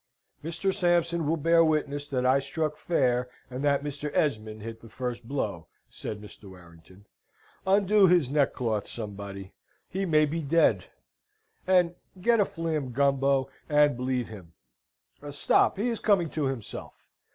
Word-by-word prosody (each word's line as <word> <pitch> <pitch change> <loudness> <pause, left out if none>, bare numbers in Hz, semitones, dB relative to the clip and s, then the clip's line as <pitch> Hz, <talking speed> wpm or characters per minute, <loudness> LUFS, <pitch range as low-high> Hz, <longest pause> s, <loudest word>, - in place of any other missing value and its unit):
"Mr. 170 +4 -1
Sampson 170 -3 +1
will 165 +2 +1
bear 165 +2 +4
witness 145 -2 0
that 130 -3 -1
I 130 +2 +4
struck 150 +2 -2
fair, 125 -7 0 0.2
and 130 +2 -4
that 140 -1 +2
Mr. 145 0 -4
Esmond 110 -6 -1
hit 115 0 -7
the 115 - -13
first 120 0 -5
blow," 100 - -3 0.2
said 105 - -6
Mr. 105 -1 -13
Warrington. 90 +1 -16 0.6
"Undo 200 +1 +5
his 175 -6 +4
neckcloth, 125 -6 0
somebody 100 -3 -7 0.3
he 195 +1 -3
may 155 -2 +4
be 160 +3 -3
dead; 140 - +3 0.8
and 180 -2 +4 0.3
get 230 +4 +3
a 205 - +4
fleam, 155 -8 -3
Gumbo, 135 0 +2 0.2
and 150 -2 +4
bleed 125 0 -1
him. 95 -7 -12 0.8
Stop! 145 - +2
He 225 +5 0
is 230 - -2
coming 185 -7 +2
to 155 -3 -1
himself! 130 -5 -6
140 Hz, 145 wpm, -27 LUFS, 115-165 Hz, 0.8 s, Undo